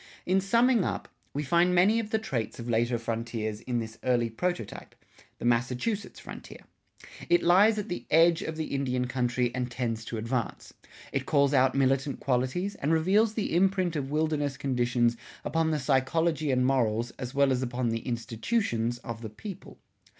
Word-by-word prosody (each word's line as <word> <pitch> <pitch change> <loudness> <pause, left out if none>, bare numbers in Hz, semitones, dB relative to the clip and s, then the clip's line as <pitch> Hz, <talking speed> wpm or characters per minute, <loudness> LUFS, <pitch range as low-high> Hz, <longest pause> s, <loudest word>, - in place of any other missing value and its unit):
In 190 +2 +2
summing 235 +2 +3
up, - - -3 0.2
we 145 - -3
find 170 +5 +3
many 200 +6 +4
of 220 -2 -4
the 220 - +1
traits 130 - -3
of 120 - -7
later 120 +1 +1
frontiers 115 -2 -3
in 125 -2 -2
this 110 -1 -5
early 120 -2 +1
prototype, 175 - -4 0.4
the - - -6
Massachusetts 125 - 0
frontier. - - -10 0.7
It 175 0 +4
lies 200 +5 +5
at 210 - -3
the 175 - -5
edge 165 +1 +5
of 160 - -4
the 160 -2 -4
Indian 130 -2 0
country 125 -1 0
and 125 -1 -2
tends 115 -2 -3
to 115 - -5
advance. 115 +2 -3 0.4
It 135 -1 -2
calls 140 -2 +3
out 130 -1 +4
militant 135 0 +1
qualities 130 +10 -1
and 150 -4 -2
reveals 200 +7 +3
the 205 -6 -1
imprint 185 -1 +2
of 140 -3 -2
wilderness 150 -2 0
conditions 120 -2 +1 0.3
upon 165 -1 +1
the 155 - +1
psychology 150 +3 +1
and 125 -1 +2
morals 120 -3 +1
as 130 0 -6
well 140 -1 +4
as 130 -1 +1
upon 125 -1 -1
the 115 0 -1
institutions 120 - -1
of 115 -1 -6
the 110 - -6
people. 185 - -9
135 Hz, 170 wpm, -28 LUFS, 120-170 Hz, 0.7 s, lies